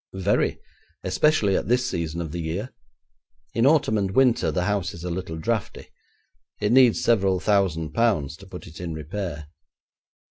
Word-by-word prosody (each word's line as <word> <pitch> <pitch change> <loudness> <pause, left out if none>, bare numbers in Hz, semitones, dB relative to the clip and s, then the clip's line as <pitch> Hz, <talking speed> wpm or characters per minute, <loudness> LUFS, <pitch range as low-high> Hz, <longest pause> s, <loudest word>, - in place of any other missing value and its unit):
'Very; 95 +2 +1 0.5
especially 100 +1 +2
at - - -1
this 125 +2 +2
season 85 -5 -3
of 80 -3 -5
the 85 +1 -4
year. 85 +10 -4 0.8
In 115 +3 +3
autumn 145 -8 +3
and 100 -1 0
winter 125 +3 +3
the 90 - -1
house 100 -2 -1
is 85 - -10
a 90 - -3
little 85 -2 -4
draughty. 110 +6 -3 0.7
It 105 +1 0
needs 125 -2 +5
several 95 -5 +2
thousand 90 -7 +1
pounds 90 - +1
to 95 - -14
put 95 +2 -9
it 80 -4 -12
in 85 -3 -4
repair.' 80 -1 -5
95 Hz, 165 wpm, -24 LUFS, 85-115 Hz, 0.8 s, needs